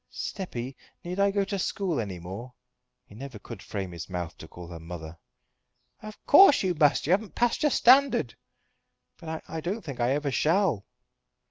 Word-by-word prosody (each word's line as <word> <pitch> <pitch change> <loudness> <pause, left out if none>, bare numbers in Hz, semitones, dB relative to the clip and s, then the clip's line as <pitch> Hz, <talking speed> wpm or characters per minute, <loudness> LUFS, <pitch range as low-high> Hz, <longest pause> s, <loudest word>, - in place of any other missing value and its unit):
"Steppy, 135 - -5 0.3
need 180 +2 -5
I 200 0 +4
go 200 0 +1
to 200 -1 -3
school 180 -5 -1
any 100 -5 -4
more?" 100 +9 -8 0.5
He - - -17
never 130 +1 -8
could 105 -1 -10
frame 95 -2 -5
his 85 +2 -8
mouth 90 -2 -4
to 80 - -10
call 90 +2 -11
her 85 -1 -8
mother. 80 -1 -9 0.8
"Of 215 0 -9
course 290 - +7
you 185 -1 +1
must. 150 -3 +3
You 160 - 0
haven't 205 +2 -1
passed 240 -1 +1
your 300 - +4
standard." 255 - +4 0.8
"But 160 -1 -6
I 160 - -5
don't 190 +7 -3
think 140 -6 -7
that 120 - +2
I - - +2
ever 145 -1 -2
shall." 160 - +1
145 Hz, 180 wpm, -27 LUFS, -, 0.8 s, course